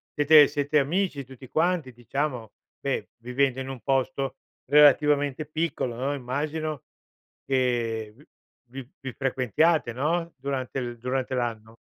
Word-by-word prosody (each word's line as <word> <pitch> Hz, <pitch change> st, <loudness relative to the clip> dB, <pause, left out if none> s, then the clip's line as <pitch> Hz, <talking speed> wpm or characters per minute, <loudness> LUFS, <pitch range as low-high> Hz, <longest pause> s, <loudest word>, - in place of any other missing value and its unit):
siete 150 Hz, 0 st, +7 dB
siete 145 Hz, 0 st, +1 dB
amici 150 Hz, 0 st, 0 dB
tutti 130 Hz, 0 st, -13 dB
quanti, 165 Hz, -2 st, 0 dB
diciamo? 120 Hz, -1 st, -3 dB, 0.3 s
Beh, 135 Hz, -1 st, -2 dB
vivendo 125 Hz, +2 st, 0 dB
in 130 Hz, -, -5 dB
un 135 Hz, -2 st, -6 dB
posto 135 Hz, 0 st, -1 dB, 0.3 s
relativamente 145 Hz, 0 st, +4 dB
piccolo, 155 Hz, -5 st, -2 dB
no, 135 Hz, +4 st, -1 dB
immagino 150 Hz, +3 st, -3 dB, 0.6 s
che 120 Hz, -5 st, 0 dB
vi 150 Hz, -, -19 dB, 0.4 s
vi 130 Hz, 0 st, -9 dB
vi 130 Hz, -2 st, -6 dB
frequentiate, 135 Hz, -, +1 dB
no, 165 Hz, +6 st, -1 dB
durante 130 Hz, -3 st, -3 dB
durante 130 Hz, +2 st, -2 dB
l'anno. 115 Hz, -2 st, -3 dB
135 Hz, 120 wpm, -26 LUFS, 125-150 Hz, 0.6 s, siete